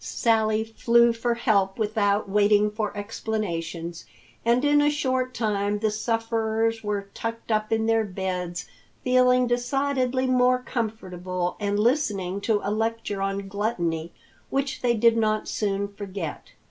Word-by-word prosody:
Sally 220 -2 +1
flew 235 +1 +3
for 235 +1 -1
help 200 -5 +1
without 210 -2 +1
waiting 210 +1 +3
for 210 -1 -2
explanations, 175 -6 -4 0.4
and 240 +4 +2
in 290 0 +5
a 295 - +4
short 260 -3 -1
time 210 -2 0
the 215 0 0
sufferers 225 0 -1
were 205 -1 -3
tucked 230 0 -5
up 215 0 0
in 220 0 +1
their 225 0 +3
beds, 180 -3 -4 0.4
feeling 250 0 +4
decidedly 255 +1 0
more 255 0 +4
comfortable 185 -8 -3
and 205 -1 0
listening 210 -6 0
to 210 -1 +1
a 200 - -1
lecture 225 -2 -2
on 195 0 -2
gluttony 175 -6 -2 0.4
which 275 +2 -2
they 240 -1 +2
did 230 +1 +4
not 215 -1 +1
soon 200 -1 -1
forget. 200 -5 -7
220 Hz, 135 wpm, -25 LUFS, 200-235 Hz, 0.4 s, in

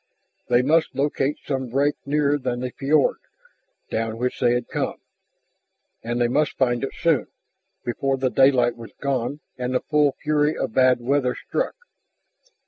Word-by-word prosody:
They 120 0 +4
must 160 +1 +2
locate 140 +1 0
some 130 -2 -2
break 140 +4 +2
nearer 145 0 +2
than 125 -2 -3
the 125 0 -3
fiord, 155 - +2 0.7
down 115 0 -2
which 125 +2 -2
they 120 -1 +3
had 120 -1 -2
come. - - -2 1.1
And 120 +1 -2
they 120 - +3
must 145 +5 0
find 120 -2 +1
it 135 - -4
soon, 165 -5 +2 0.6
before 135 +3 -1
the 130 -1 0
daylight 130 -3 +4
was 115 -1 -11
gone 140 +1 -2 0.2
and 125 +1 -2
the - - +4
full 150 -1 +2
fury 150 0 0
of - - -3
bad 130 -1 +4
weather 130 0 +1
struck. - - -3
130 Hz, 155 wpm, -23 LUFS, 120-145 Hz, 1.1 s, They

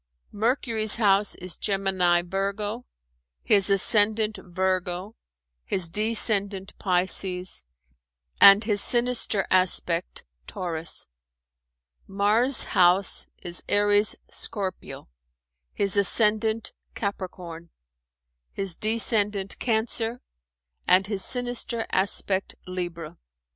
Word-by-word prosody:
Mercury's 220 -1 +1
house 205 -2 +1
is 180 -2 -4
Gemini 190 -3 0
Virgo, 200 +5 -4 0.6
his 200 -1 +3
ascendant 210 +1 +3
Virgo, 185 +2 -3 0.5
his 170 - 0
descendant 205 -2 +1
Pisces, 180 - -1 0.8
and 200 +2 +8
his 205 -2 +1
sinister 240 -4 0
aspect 180 -2 0 0.2
Taurus. 165 -2 -4 1.0
Mars' 215 +6 +2
house 180 +2 +2 0.2
is 175 0 -2
Aries 205 +1 +2
Scorpio, 190 -4 -5 0.6
his 200 -1 0
ascendant 220 +2 +2 0.2
Capricorn, 180 -4 -7 0.8
his 195 -4 +1
descendant 210 -2 0
Cancer 230 +1 -2 0.7
and 185 +1 +4
his 195 -1 -3
sinister 245 -2 -1
aspect 190 0 0
Libra." 175 -3 -7
200 Hz, 80 wpm, -24 LUFS, 185-215 Hz, 1.0 s, and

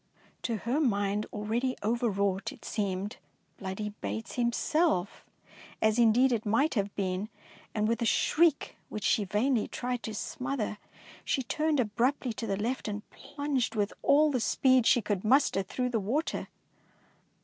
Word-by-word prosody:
To 230 -2 -1
her 240 +7 -1
mind, 205 -6 +1
already 230 +5 -1
overwrought, 200 -4 0
it - - -14
seemed 200 -1 -2 0.2
" - - -42
Bloody 200 +2 -4
Bates'' 105 +2 -4
himself, 240 - +1 0.6
as 220 +2 +2
indeed 240 +3 +5
it 230 -3 0
might 230 +9 +2
have 200 -3 -1
been, 190 +1 -2 0.5
and 215 0 +1
with 230 0 0
a 235 - +2
shriek 315 +3 +2
which 215 - -5
she 210 - +2
vainly 220 +5 +1
tried 245 -1 -3
to 220 -2 -5
smother, 250 -2 -3 0.4
she 265 - 0
turned 305 +4 0
abruptly 245 +3 0
to 225 +1 -5
the 195 -1 -1
left 235 +5 -2
and 210 0 -5
plunged 285 -5 -2
with 205 -1 0
all 300 +1 +5
the 255 - +1
speed 255 +1 +3
she 240 -4 +4
could 200 -3 -1
muster 245 -3 +3
through 250 +6 -2
the 235 -2 0
water. 255 +11 -1
225 Hz, 155 wpm, -30 LUFS, 205-255 Hz, 0.6 s, indeed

